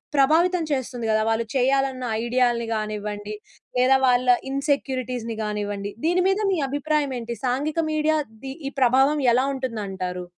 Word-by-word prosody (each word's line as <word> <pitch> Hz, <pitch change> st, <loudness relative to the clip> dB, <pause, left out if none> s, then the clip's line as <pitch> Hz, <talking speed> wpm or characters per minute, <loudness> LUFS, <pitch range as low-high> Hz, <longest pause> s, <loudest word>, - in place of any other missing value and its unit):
ప్రభావితం 330 Hz, +6 st, +3 dB
చేస్తుంది 250 Hz, -4 st, -2 dB
కదా! 215 Hz, -, +2 dB
వాళ్ళు 225 Hz, +1 st, 0 dB
చేయాలన్న 265 Hz, 0 st, +1 dB, 0.2 s
ఐడియా‌లని 240 Hz, -1 st, +1 dB
గానివ్వండి, 210 Hz, -1 st, -4 dB, 0.4 s
లేదా 260 Hz, +1 st, +5 dB
వాళ్ళ 250 Hz, 0 st, +3 dB, 0.2 s
ఇన్‌సెక్యూరిటీస్‌ని 255 Hz, -5 st, -2 dB
గానివ్వండి, 205 Hz, -1 st, -3 dB
దీని 355 Hz, +2 st, +3 dB
మీద 390 Hz, -, +1 dB
మీ -, -, 0 dB
అభిప్రాయం 290 Hz, 0 st, 0 dB
ఏంటి? 235 Hz, 0 st, -5 dB
సాంఘిక 290 Hz, +6 st, -1 dB
మీడియా‌ 310 Hz, 0 st, +2 dB, 0.3 s
ది 265 Hz, -, -5 dB, 0.2 s
ఈ -, -, -15 dB
ప్రభావం 265 Hz, +4 st, +4 dB
ఎలా 255 Hz, +2 st, +3 dB
ఉంటుందంటారు? 195 Hz, -8 st, -4 dB
255 Hz, 135 wpm, -24 LUFS, 225-280 Hz, 0.4 s, లేదా